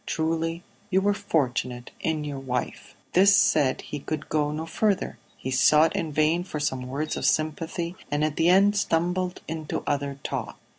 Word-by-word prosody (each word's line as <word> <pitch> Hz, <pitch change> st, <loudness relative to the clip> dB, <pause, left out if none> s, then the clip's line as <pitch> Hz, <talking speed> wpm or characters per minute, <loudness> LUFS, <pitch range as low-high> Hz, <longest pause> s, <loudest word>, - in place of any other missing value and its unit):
Truly 165 Hz, +1 st, -1 dB, 0.3 s
you 190 Hz, -1 st, +3 dB
were 205 Hz, +1 st, +2 dB
fortunate 125 Hz, -8 st, -1 dB
in 160 Hz, -2 st, -1 dB
your 145 Hz, -2 st, -4 dB
wife." 125 Hz, -2 st, -4 dB, 0.2 s
This 195 Hz, +2 st, +6 dB
said, 140 Hz, -4 st, +3 dB
he 150 Hz, -, -6 dB
could 155 Hz, +1 st, -5 dB
go 150 Hz, -1 st, +1 dB
no 155 Hz, +2 st, -4 dB
further; 200 Hz, +4 st, 0 dB, 0.2 s
he 130 Hz, -, -5 dB
sought 150 Hz, +5 st, +5 dB
in 160 Hz, -2 st, -2 dB
vain 155 Hz, +4 st, +2 dB
for 155 Hz, -4 st, -5 dB
some 130 Hz, -3 st, -2 dB
words 145 Hz, +4 st, -3 dB
of -, -, -4 dB
sympathy, 165 Hz, +3 st, -1 dB
and 145 Hz, +1 st, 0 dB
at 155 Hz, -1 st, -2 dB
the 165 Hz, +1 st, +3 dB
end 200 Hz, +3 st, +5 dB
stumbled 180 Hz, 0 st, 0 dB
into 155 Hz, -1 st, -4 dB
other 140 Hz, -1 st, -1 dB
talk. -, -, -4 dB
155 Hz, 170 wpm, -26 LUFS, 145-170 Hz, 0.3 s, This